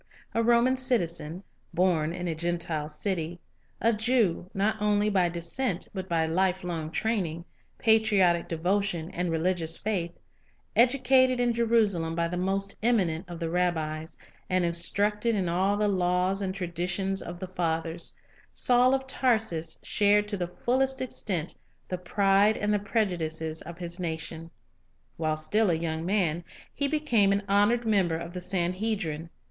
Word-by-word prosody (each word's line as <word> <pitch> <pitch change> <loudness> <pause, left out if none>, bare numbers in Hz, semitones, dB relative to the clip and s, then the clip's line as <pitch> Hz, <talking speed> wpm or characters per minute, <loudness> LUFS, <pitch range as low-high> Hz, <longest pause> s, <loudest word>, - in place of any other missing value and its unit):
A 230 - +1
Roman 240 +3 +3
citizen, 180 - -1 0.3
born 170 -3 +2
in 180 +1 -4
a 165 - -1
Gentile 165 -2 -2
city; 170 +1 -3 0.4
a 230 +1 +3
Jew, 215 -6 +1
not 210 +2 -1
only 210 0 +2
by 185 -3 +2
descent 175 +4 -2
but 190 -2 -5
by 165 -1 +1
lifelong 175 -2 -1
training, 170 -4 -2 0.3
patriotic 205 -6 +3
devotion, 175 0 -1
and 180 0 -2
religious 165 0 0
faith; 190 -6 -2 0.7
educated 255 +1 +4
in 240 -1 +2
Jerusalem 215 -8 +1
by 170 0 0
the 175 - -4
most 195 +2 -1
eminent 185 -8 +1
of 170 -1 -7
the 165 -1 -3
rabbis, 160 -3 -1 0.3
and 185 -1 +2
instructed 210 +6 +1
in 190 -3 0
all 190 +4 +1
the 210 0 +1
laws 185 0 +1
and 190 -1 -2
traditions 180 +2 -1
of 170 +1 -7
the 185 - -5
fathers, 165 -2 -1 0.3
Saul 250 +1 +4
of 265 0 -3
Tarsus 220 -11 0
shared 205 0 +3
to 205 - -1
the 175 -2 -2
fullest 260 +8 0
extent 195 -9 -3 0.3
the 180 - -4
pride 200 +3 +3
and 210 0 0
the 205 - +2
prejudices 165 -7 -1
of 170 +1 -9
his 175 0 -4
nation. 165 -1 -4 0.7
While 155 -1 0
still 200 +7 +3
a 170 - +2
young 160 0 -3
man, 175 -4 0 0.3
he 285 - 0
became 275 -10 +2
an 200 +1 +1
honored 205 +4 +3
member 190 -7 +2
of 170 +1 -7
the 180 - -4
Sanhedrin. 180 -2 -1
185 Hz, 150 wpm, -27 LUFS, 170-210 Hz, 0.7 s, educated